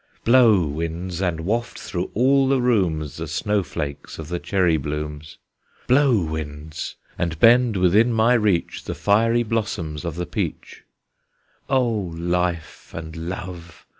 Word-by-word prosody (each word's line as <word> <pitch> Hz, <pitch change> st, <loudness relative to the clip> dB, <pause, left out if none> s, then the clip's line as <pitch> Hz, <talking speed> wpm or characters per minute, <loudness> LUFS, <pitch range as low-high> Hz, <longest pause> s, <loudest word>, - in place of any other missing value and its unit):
Blow, 115 Hz, -6 st, +6 dB
winds! 85 Hz, +4 st, -4 dB
and 85 Hz, -4 st, -1 dB
waft 115 Hz, +7 st, -2 dB
through 90 Hz, 0 st, -4 dB
all 135 Hz, +4 st, +4 dB
the 135 Hz, 0 st, +2 dB
rooms 90 Hz, -, 0 dB
The 80 Hz, 0 st, -5 dB
snow 105 Hz, +6 st, 0 dB
flakes 70 Hz, -3 st, -6 dB
of 80 Hz, -1 st, -8 dB
the 90 Hz, 0 st, -2 dB
cherry 90 Hz, -4 st, +1 dB
blooms! 75 Hz, +1 st, -5 dB, 0.5 s
Blow, 130 Hz, -6 st, +4 dB
winds! 80 Hz, 0 st, -6 dB, 0.2 s
and 85 Hz, -2 st, -1 dB
bend 120 Hz, -1 st, +5 dB
within 100 Hz, +6 st, +4 dB
my 115 Hz, +2 st, +3 dB
reach 105 Hz, -7 st, 0 dB
The -, -, -4 dB
fiery 115 Hz, +3 st, +2 dB
blossoms 105 Hz, -9 st, -3 dB
of 85 Hz, -3 st, -4 dB
the 90 Hz, +1 st, -3 dB
peach! -, -, -5 dB, 0.8 s
O 130 Hz, -2 st, +3 dB
Life 90 Hz, -4 st, -3 dB
and 80 Hz, 0 st, -7 dB
Love! 85 Hz, 0 st, -7 dB
90 Hz, 135 wpm, -22 LUFS, 80-115 Hz, 0.8 s, Blow